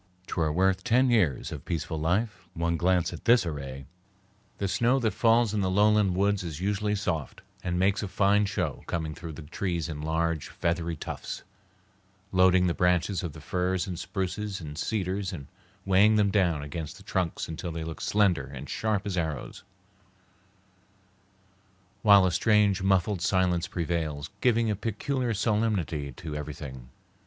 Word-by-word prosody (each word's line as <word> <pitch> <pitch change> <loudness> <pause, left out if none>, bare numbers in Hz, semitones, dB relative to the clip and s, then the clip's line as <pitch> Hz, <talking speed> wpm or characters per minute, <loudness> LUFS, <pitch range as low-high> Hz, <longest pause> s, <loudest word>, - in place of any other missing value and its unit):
"'T - - -6
were 80 -2 +2
worth 95 +3 +2
ten 125 +2 +3
years 90 - +2
of - - -6
peaceful 80 -1 -3
life, 95 +4 -1
one 85 0 0
glance 90 +1 +1
at 85 - -9
this 120 -5 +5
array." 70 -4 -5 0.7
The 100 - -1
snow 120 +6 +2
that 115 -5 +1
falls 115 -2 +3
in 105 - +1
the 95 - +1
lowland 105 -1 +3
woods 100 +1 +2
is 80 -3 -5
usually 105 +2 0
soft, 90 -8 -3 0.2
and 90 -1 -1
makes 95 +2 +2
a 105 - -3
fine 100 +1 +3
show 90 -8 -2
coming 80 -2 -2
through 85 -1 -8
the 80 - -9
trees 85 +1 -2
in 75 -3 -5
large, 80 0 -1
feathery 85 -1 -1
tufts, - - -6 0.9
loading 95 0 +5
the 85 - +2
branches 90 +2 +1
of 85 -5 -5
the - - -11
firs 90 0 -1
and 90 -4 -5
spruces 100 +2 -3
and 75 -3 -7
cedars 95 +2 -2
and 75 -7 -7 0.4
weighing 100 +3 +5
them 105 -2 +3
down 85 -8 +2
against 75 +1 -6
the - - -14
trunks 90 -3 -2
until 80 +2 -5
they 80 0 -4
look 80 0 -6
slender 90 -10 +2
and 70 +1 -8
sharp 105 -2 -1
as 95 -3 -1
arrows, 80 -6 -4 2.4
while 100 -3 +7
a 90 - +2
strange, 100 +1 +3
muffled 95 0 +2
silence 90 -2 +1
prevails, 80 -2 -3
giving 115 -2 +3
a - - 0
peculiar 120 +4 -2
solemnity 105 -9 0
to 75 +3 -7
everything. 70 -4 -7
90 Hz, 165 wpm, -28 LUFS, 80-105 Hz, 2.4 s, while